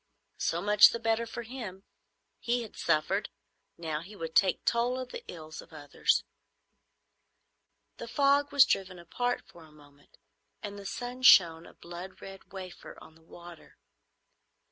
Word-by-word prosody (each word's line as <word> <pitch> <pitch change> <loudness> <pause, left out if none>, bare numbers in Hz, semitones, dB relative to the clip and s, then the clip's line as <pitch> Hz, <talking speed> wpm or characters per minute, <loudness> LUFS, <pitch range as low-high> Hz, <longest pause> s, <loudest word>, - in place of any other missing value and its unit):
So 170 +2 -1
much 210 0 +7
the 235 - -4
better 225 0 0
for 235 +1 -6
him. 220 -6 -8 0.6
He 240 0 -1
had 220 - -11
suffered. 170 +5 0 0.5
Now 160 -3 -3
he 195 +5 -12
would 165 -4 -6
take 190 -2 +3
toll 240 +2 +1
of 255 -1 -6
the - - -8
ills 155 -2 -9
of 170 - -18
others. 145 -2 0 1.7
The 235 - -7
fog 280 +3 +2
was 280 -2 +7
driven 185 -5 -1
apart 245 +9 -2
for 170 - -16
a 155 - -17
moment, 145 -1 -21 0.5
and 205 -1 -6
the 200 - -7
sun 245 +4 -6
shone, 170 -9 +6
a - - -16
blood 175 +2 -10
red 195 0 -12
wafer, 185 -2 -9
on 160 - -15
the 160 - -22
water. 170 +1 -14
195 Hz, 155 wpm, -30 LUFS, 165-235 Hz, 1.7 s, much